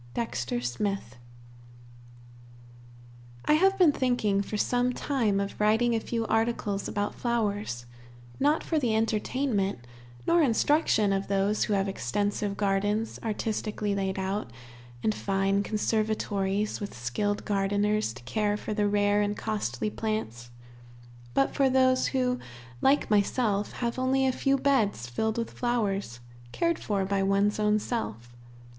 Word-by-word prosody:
Dexter 120 - -2
Smith. 125 - -3 2.3
I - - +4
have 385 +5 +4
been 355 -5 +6
thinking 245 -7 +1
for 210 +1 -4
some 245 +3 +1
time 230 -8 0
of 200 +1 -4
writing 220 +3 +3
a 225 - +2
few 230 0 -2
articles 225 -3 0
about 205 0 -2
flowers, 205 - -2 0.5
not 295 +3 +2
for 320 - 0
the 235 -6 +1
entertainment 220 - 0 0.4
nor 340 0 +4
instruction 235 -5 +3
of 195 0 -1
those 200 +2 +1
who 210 - -1
have 195 0 +1
extensive 200 - -2
gardens 205 +2 0
artistically 215 -1 -2
laid 195 -1 -1
out, 190 - -2 0.5
and 215 - +2
fine 195 0 0
conservatories 210 -1 -1
with 200 -10 -6
skilled 205 - -2
gardeners 205 - +1
to - - -12
care 205 - 0
for 215 - -4
the 210 -1 +1
rare 205 0 +2
and 205 0 -1
costly 210 - -2
plants, 120 - -3 0.9
but 275 - +2
for 275 -1 +3
those, 260 0 +3
who, 250 -2 0 0.4
like 275 -4 +3
myself, 205 0 +1
have 235 +1 -2
only 265 +1 +2
a 260 - +3
few 275 +2 +1
beds 260 - +1
filled 220 - -2
with 230 -1 -2
flowers, 200 - -1 0.3
cared 335 -1 0
for 200 -2 -1
by 195 0 0
one's 200 +2 +2
own 210 0 +3
self. 120 - -4
210 Hz, 135 wpm, -28 LUFS, 195-235 Hz, 2.3 s, been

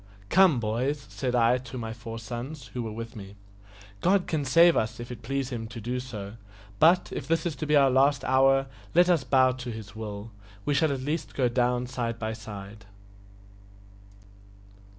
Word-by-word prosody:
"Come, 180 -8 +5
boys," 125 +6 -1
said 125 -2 -2
I 120 +1 +4
to 125 0 -9
my 115 -2 -4
four 115 0 -8
sons, 120 +5 -7
who 125 - -3
were 110 -2 -4
with 115 +2 -7
me, 100 -2 -10 0.7
"God 190 0 +3
can 155 -3 -1
save 165 +6 +6
us 110 +1 -1
if 120 +1 -7
it 120 -2 -8
please 135 +2 -3
Him 115 -2 -4
so 115 - -10
to 115 - -7 0.2
do; 110 -6 -7 0.5
but, 175 +3 +4
if - - -5
this 165 0 +1
is 165 -4 -2
to 155 - -4
be 150 - +3
our 135 -2 +5
last 135 +1 +3
hour, 135 +1 +4 0.3
let 175 +1 +6
us 170 -6 +3
bow 130 -1 +4
to 125 -1 -6
His 110 -3 -8
will 105 0 -6 0.3
we 145 - +1
shall 155 +1 +2
at 135 -2 -3
least 150 +5 -3
go 130 -3 +2
down 125 0 +1
side 120 -2 -3
by 110 -1 -3
side." 105 -2 -9
125 Hz, 190 wpm, -27 LUFS, 115-140 Hz, 0.7 s, save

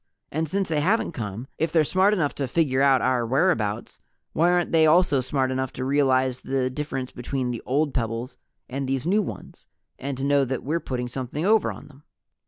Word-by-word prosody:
And 160 +1 -2
since 195 +3 0
they 155 -2 0
haven't 200 +7 +1
come, 110 - -5
if 160 0 0
they're 160 -2 +4
smart 185 +6 +3
enough 170 -9 0
to 140 - -3
figure 135 -1 +1
out 135 -2 +4
our 130 -2 +2
whereabouts 115 - 0 0.3
why 170 +3 +3
aren't 175 -1 +1
they 160 -1 +5
also 155 -4 +4
smart 130 0 -1
enough 130 0 -2
to 130 - -4
realize 130 -2 +2
the 130 -1 -1
difference 135 -2 -4
between 125 0 -3
the 120 - -5
old 145 +2 +1
pebbles 115 0 -3 0.3
and 135 +1 -4
these 135 +1 -1
new 200 +5 +3
ones, - - -8 0.3
and 135 0 -4
to 135 - -4
know 140 0 +3
that 130 -1 -3
we're 155 +5 -1
putting 125 -5 -4
something 130 +5 -4
over 215 +1 +3
on 145 - -11
them?" 145 -1 -18
135 Hz, 200 wpm, -24 LUFS, 130-160 Hz, 0.3 s, they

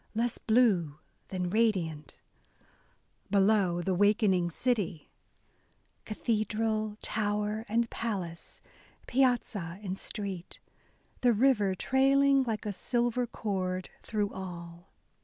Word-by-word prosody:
less 235 +1 0
blue 200 - +2 0.3
than 180 -2 -3
radiant/* 180 -9 0 1.1
Below, 195 -3 +3
the 190 - 0
wakening 200 -2 +3
city, 195 - -2 1.0
••Cathedral, 215 -1 -1
tower 210 +1 -1
and 230 +2 +2
palace, 185 -7 -4 0.4
piazza 230 -9 0
and 190 -2 -3
street; 195 -5 -5 0.6
The 245 -1 +4
river 210 -5 +3
trailing 275 +5 +4
like 225 -4 -2
a 210 - -2
silver 240 +4 0
cord 185 -5 -3
Through 210 -2 -2
all." 175 -1 -8
210 Hz, 95 wpm, -30 LUFS, 185-230 Hz, 1.1 s, The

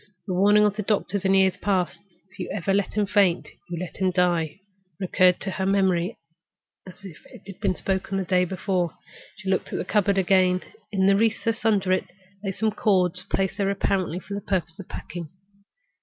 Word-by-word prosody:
The 185 - -3
warning 205 +3 +5
of 205 0 0
the - - 0
doctors 200 -1 -1
in 190 - +3 0.3
past 190 -3 0
years—"If 190 0 -27
you - - -4
ever 195 -1 -1
let 200 0 0
him 210 -1 +2
faint, 190 -3 +2 0.2
you 175 - -4
let 180 -1 -6
him 190 -1 +2
die"—recurred 180 +1 0
to 195 - -2
her 190 0 -2
memory 190 -1 +1 0.7
as 185 +2 -13
if 175 -5 -10
it - - -15
had 195 -1 -10
been 195 -4 0
spoken 195 +1 -2
the 190 - -1
day 180 +1 +3
before. 180 -1 -2 0.4
She 195 -2 -10
looked - - -1
at - - -2
the - - -3
cupboard 200 -2 +2
again. 185 -1 +3 0.3
In 190 -2 +2
a 195 - +5
recess 225 +2 0
under 200 -4 +2
it 185 - +2 0.4
lay 195 - -1
some 220 +3 0
ends - - -6
of - - -15
cord, 185 -3 +3
placed 195 +1 -1
there 195 -1 +2
apparently 190 -3 0
for 200 +2 -6
purposes 180 -4 -2
of 195 - -9
packing. 170 -3 -7
190 Hz, 195 wpm, -25 LUFS, 180-200 Hz, 0.7 s, warning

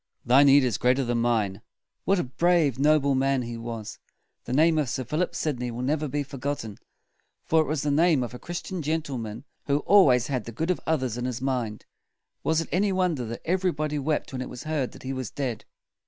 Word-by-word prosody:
Thy 125 +3 +6
need 140 0 +6
is 120 -5 0
greater 125 +2 +3
than 120 0 0
mine." 110 -4 0 0.4
What 195 - +3
a 175 - +1
brave, 150 0 +2
noble 145 -1 +4
man 135 -1 +1
he 120 0 -5
was! 115 -2 -6 0.5
The - - -6
name 155 +4 +4
of 145 -5 0
Sir 130 - -2
Philip 155 +8 -2
Sidney 125 -5 -2
will 120 +1 -5
never 150 +3 0
be 145 +2 -2
for 140 -1 -10
got 140 +2 -1
ten; 110 -3 -8 0.7
for 160 0 +4
it 155 - -2
was 150 -1 -1
the 150 - +1
name 155 -2 +3
of 120 - -6
a 125 - -8
Chris 175 0 -5
tian 185 -3 -5
gen 160 +2 -1
tle 135 -5 -5
man 110 +1 -6 0.2
who 145 +1 +2
always 130 - +5
had 130 -4 -2
the 115 - -6
good 160 +10 -1
of 180 - -2
others 130 -7 0
in 120 - -3
his 125 -1 -3
mind. 125 -5 -2 0.6
Was 160 0 +2
it - - -7
any 195 +3 +2
wonder 180 -9 0
that 115 +1 -7
everybody 160 -4 0
wept 150 0 -2
when 130 - -3
it 130 - -5
was 125 - -8
heard 155 -5 -2
that - - -13
he 130 +1 -3
was 130 -4 -4
dead? 125 -6 -4
135 Hz, 230 wpm, -26 LUFS, 125-155 Hz, 0.7 s, Thy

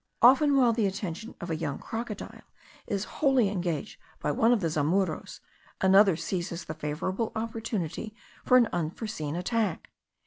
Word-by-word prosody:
Often 275 +3 +6
while 245 -3 +5
the 220 -3 +1
attention 195 +2 -5
of 175 -1 -5
a - - 0
young 155 -3 -3
crocodile 225 -2 -6 0.5
is 200 -2 -1
wholly 265 -4 +2
engaged 180 -2 -3 0.2
by - - -1
one 230 -1 +3
of 240 - +4
the 170 - 0
zamuros, 160 +3 -1 0.4
another 195 -1 +6
seizes 175 +1 -4
the 155 - -5
favourable 160 +8 -3
opportunity 220 -3 -3 0.3
for 255 - +6
an 240 -2 +5
unforeseen 165 -2 -3
attack. 200 +1 -1
195 Hz, 145 wpm, -28 LUFS, 170-230 Hz, 0.5 s, Often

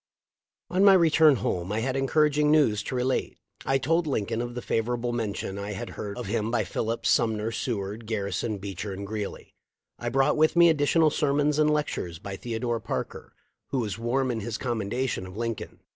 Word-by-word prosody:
On 185 +2 +3
my 200 -1 +8
return 160 -4 +6
home 90 -4 -2
I 110 +1 0
had 130 +2 -1
encouraging 150 +2 +2
news 140 -9 +4
to 130 - -5
relate. 125 +1 -1 0.3
I 135 - +3
told 165 +4 +1
Lincoln 115 -4 -1
of 120 0 -5
the 125 - -4
favorable 120 +1 -1
mention 100 -4 -3
I 100 +1 -4
had 95 - -6
heard 100 -1 -6
of - - -4
him 105 +2 -1
by 115 -2 +1
Phillips, 110 +4 -2
Sumner, 110 -1 +2
Seward, 110 -1 -4
Gar 110 -3 -1
rison, 100 +2 -2
Beecher, 100 0 -5
and 100 +1 -6
Greeley. 105 0 -6 0.5
I 120 - -2
brought 135 +4 +2
with 155 +2 +3
me 170 0 +7
additional 155 +1 +3
sermons 145 0 +1
and 150 0 +4
lectures 145 - -1
by 100 +3 -7
Theodore 115 +2 -2
Parker, - - -5 0.3
who 135 - -2
was 110 -3 -2
warm 125 +3 0
in 115 - -2
his 110 +2 -4
commendation 120 -3 -2
of 95 +2 -10
Lincoln. 115 -1 -4
120 Hz, 190 wpm, -27 LUFS, 105-140 Hz, 0.5 s, my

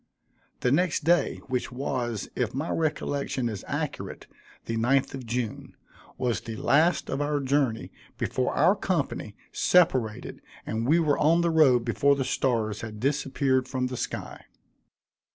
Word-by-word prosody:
The 125 - +2
next 165 +1 +1
day, 175 +3 +2
which 130 -1 -2
was, 125 -4 -3
if - - -1
my 145 +5 -2
recollection 145 -5 -1
is 105 -4 -5
accurate, - - -4 0.4
the 115 - -3
ninth 130 +5 +2
of 130 -3 -7
June, 115 -1 -4 0.4
was 125 -2 -1
the 115 -1 -6
last 155 +9 +2
of 135 - -2
our 145 0 0
journey 135 -4 0 0.3
before 130 - -1
our 175 +7 +4
company 165 - -2 0.2
separated; 130 -12 +2 0.2
and 115 +2 -2
we 160 +4 +4
were 150 -3 +2
on 165 +3 +4
the 170 -1 +2
road 135 -7 +4
before 140 +4 +3
the 135 -1 -2
stars 115 -5 0
had 110 -1 -7
disappeared 135 0 +1
from 130 -2 -2
the 125 0 -3
sky. - - -5
135 Hz, 150 wpm, -27 LUFS, 120-150 Hz, 0.4 s, our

